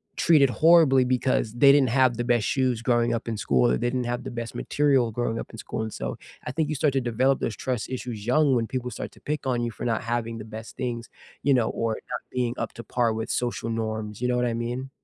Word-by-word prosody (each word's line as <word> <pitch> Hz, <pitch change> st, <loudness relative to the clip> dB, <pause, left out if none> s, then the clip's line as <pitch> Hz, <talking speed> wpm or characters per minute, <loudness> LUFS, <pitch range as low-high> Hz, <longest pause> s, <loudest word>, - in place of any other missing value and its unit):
treated 145 Hz, -6 st, +4 dB
horribly 155 Hz, -4 st, +5 dB
because 125 Hz, -3 st, +1 dB
they 140 Hz, +3 st, +6 dB
didn't 140 Hz, -3 st, +4 dB
have 130 Hz, -1 st, +3 dB
the 120 Hz, -, -1 dB
best 120 Hz, -3 st, +2 dB
shoes 130 Hz, -4 st, +1 dB
growing 120 Hz, -1 st, +2 dB
up 115 Hz, -, -5 dB
in 115 Hz, -, -2 dB
school 65 Hz, -10 st, +2 dB
or 60 Hz, -, +2 dB
they -, -, -1 dB
didn't 125 Hz, 0 st, -1 dB
have 120 Hz, +1 st, -2 dB
the 130 Hz, -, -5 dB
best 115 Hz, -1 st, -5 dB
material 135 Hz, -5 st, +2 dB
growing 115 Hz, 0 st, -2 dB
up -, -, -7 dB
in 115 Hz, -, -10 dB
school. 110 Hz, -, -5 dB
And 110 Hz, -, -5 dB
so, -, -, -4 dB, 0.3 s
I -, -, -3 dB
think 155 Hz, +2 st, -1 dB
you 155 Hz, -, -1 dB
start 145 Hz, 0 st, +1 dB
to 135 Hz, -, +1 dB
develop 130 Hz, +3 st, +1 dB
those 110 Hz, -, -2 dB
trust 125 Hz, -4 st, -3 dB
issues 120 Hz, -5 st, -5 dB
young 140 Hz, +1 st, +4 dB
when 115 Hz, -2 st, 0 dB
people 125 Hz, 0 st, -4 dB
start -, -, -6 dB
to -, -, -18 dB
pick 150 Hz, -2 st, -3 dB
on 125 Hz, -2 st, +1 dB
you 120 Hz, -, -2 dB
for 115 Hz, -, -7 dB
not 115 Hz, -2 st, 0 dB
having 115 Hz, 0 st, -2 dB
the 105 Hz, -, -7 dB
best 110 Hz, +1 st, -9 dB
things, 120 Hz, -2 st, -4 dB, 0.3 s
you 140 Hz, -, +4 dB
know, 120 Hz, -3 st, +2 dB
or 115 Hz, -1 st, -1 dB, 0.2 s
not 125 Hz, -, -2 dB
being 125 Hz, -2 st, -1 dB
up -, -, -3 dB
to 115 Hz, -, -9 dB
par 120 Hz, +1 st, +1 dB
with 110 Hz, +1 st, -3 dB
social 120 Hz, -1 st, -2 dB
norms. 110 Hz, -1 st, -3 dB
You 125 Hz, -, +1 dB
know 125 Hz, -, +1 dB
what 125 Hz, -, +1 dB
I 120 Hz, -, -1 dB
mean? 120 Hz, +3 st, -4 dB
120 Hz, 260 wpm, -25 LUFS, 115-130 Hz, 0.3 s, they